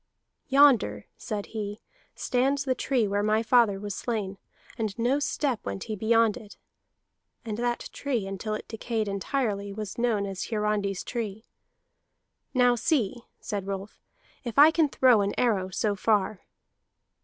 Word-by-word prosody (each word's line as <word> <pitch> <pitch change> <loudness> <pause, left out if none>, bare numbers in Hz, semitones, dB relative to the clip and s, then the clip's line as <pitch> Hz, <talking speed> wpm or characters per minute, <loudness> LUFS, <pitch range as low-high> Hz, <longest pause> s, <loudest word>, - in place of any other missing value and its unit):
"Yonder," 260 - +4
said 210 -3 -4
he, 210 -1 -5 0.4
"stands 270 +3 +1
the 260 - +2
tree 250 -4 0
where 200 +1 0
my 215 +2 +2
father 230 -4 +4
was 205 0 -5
slain, 200 -3 -3 0.4
and 215 -3 -3
no 245 +5 +2
step 285 -4 -1
went 100 0 -4
he 215 - -4
beyond 225 +1 +3
it. 210 -2 -12 0.9
[And 215 -2 -3
that 240 0 -1
tree, 250 -8 -2
until 195 +2 -3
it - - -7
decayed 225 -1 -3
entirely, 200 0 -2
was 210 +1 -6
known 225 -4 +1
as 195 -2 -4
Hiarandi's 210 -3 -1
tree.] 220 -3 -5 1.1
Now 250 -2 +4
see," 240 -2 0 0.2
said 200 -3 -4
Rolf, 195 +1 -6 0.4
"if 235 -1 -6
I 300 +3 +9
can 320 -2 +2
throw 250 -5 +5
an 200 0 -1
arrow 205 -6 +1
so 205 +2 0
far." 205 -1 0
215 Hz, 145 wpm, -27 LUFS, 200-245 Hz, 1.1 s, I